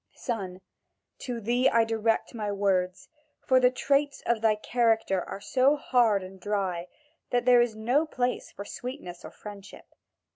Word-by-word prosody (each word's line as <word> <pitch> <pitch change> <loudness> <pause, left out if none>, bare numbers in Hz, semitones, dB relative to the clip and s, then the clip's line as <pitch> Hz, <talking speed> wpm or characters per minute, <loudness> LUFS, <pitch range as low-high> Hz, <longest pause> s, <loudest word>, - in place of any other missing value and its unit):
Son, 190 -6 -4 0.6
to 245 -3 -4
thee 245 +4 +2
I 230 0 +4
direct 225 0 0
my 210 -3 -3
words, 190 -2 0 0.4
for 260 -1 +5
the 250 0 +5
traits 280 +3 0
of 235 -2 +1
thy 220 -1 +3
character 225 -4 +1
are - - -7
so 260 +7 +3
hard 235 -8 +2
and 190 +1 -11
dry, 190 -4 -2 0.4
that 245 -1 0
there 245 -1 +7
is 240 -2 0
no 250 +9 +1
place 250 -4 -2
for 200 - -8
sweetness 225 -8 -7
or - - -8
friendship. 205 -1 -12
225 Hz, 155 wpm, -28 LUFS, 200-250 Hz, 0.6 s, there